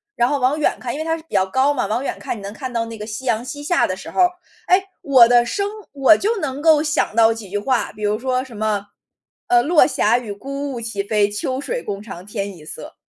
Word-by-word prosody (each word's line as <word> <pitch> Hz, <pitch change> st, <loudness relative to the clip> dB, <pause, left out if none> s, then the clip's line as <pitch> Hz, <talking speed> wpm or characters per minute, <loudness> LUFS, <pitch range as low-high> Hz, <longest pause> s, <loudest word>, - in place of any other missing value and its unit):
然 240 Hz, -, +3 dB
后 285 Hz, +1 st, 0 dB
往 265 Hz, +5 st, +1 dB
远 -, -, +1 dB
看 245 Hz, -, -4 dB
因 290 Hz, -, -5 dB
为 315 Hz, -, -3 dB
它 325 Hz, 0 st, 0 dB
是 315 Hz, -, -13 dB
比 -, -, -17 dB
较 190 Hz, -, +4 dB
高 265 Hz, +9 st, +2 dB
嘛， 245 Hz, -, -1 dB
往 230 Hz, +6 st, -1 dB
远 -, -, -3 dB
看 -, -, -4 dB
你 -, -, -10 dB
能 200 Hz, +1 st, -6 dB
看 255 Hz, +3 st, -6 dB
到 230 Hz, -1 st, 0 dB
那 225 Hz, 0 st, -8 dB
个 210 Hz, -, -6 dB
夕 225 Hz, +4 st, -6 dB
阳 230 Hz, -2 st, 0 dB
西 290 Hz, +3 st, -7 dB
下 340 Hz, +4 st, +2 dB
的 185 Hz, -, -2 dB
时 -, -, -9 dB
候 -, -, +1 dB
儿。 360 Hz, 0 st, +5 dB, 0.4 s
哎， 370 Hz, +2 st, +4 dB, 0.2 s
我 260 Hz, -4 st, +6 dB
的 240 Hz, 0 st, +5 dB
生 400 Hz, +9 st, -1 dB, 0.2 s
我 280 Hz, +3 st, +5 dB
就 440 Hz, +2 st, 0 dB
能 275 Hz, -1 st, -3 dB
够 310 Hz, -1 st, +5 dB
想 300 Hz, -8 st, 0 dB
到 225 Hz, 0 st, +5 dB
几 220 Hz, -4 st, -9 dB
句 205 Hz, -, -2 dB
话， 245 Hz, +4 st, 0 dB
比 210 Hz, -, -10 dB
如 210 Hz, +1 st, 0 dB
说 255 Hz, 0 st, -1 dB
什 255 Hz, -4 st, -12 dB
么， 210 Hz, -2 st, -1 dB, 0.6 s
呃， 360 Hz, -1 st, +4 dB
“落 325 Hz, +1 st, +5 dB
霞 240 Hz, -4 st, +2 dB
与 220 Hz, -5 st, -6 dB
孤 275 Hz, +6 st, -5 dB
鹜 235 Hz, -, -5 dB
齐 210 Hz, -3 st, -3 dB
飞， 205 Hz, 0 st, +1 dB
秋 255 Hz, +6 st, -3 dB
水 485 Hz, +10 st, -3 dB
共 200 Hz, 0 st, -5 dB
长 185 Hz, -4 st, -9 dB
天 200 Hz, -1 st, -5 dB
一 155 Hz, -, -14 dB
色”。 -, -, -9 dB
245 Hz, 290 characters per minute, -20 LUFS, 210-290 Hz, 0.6 s, 我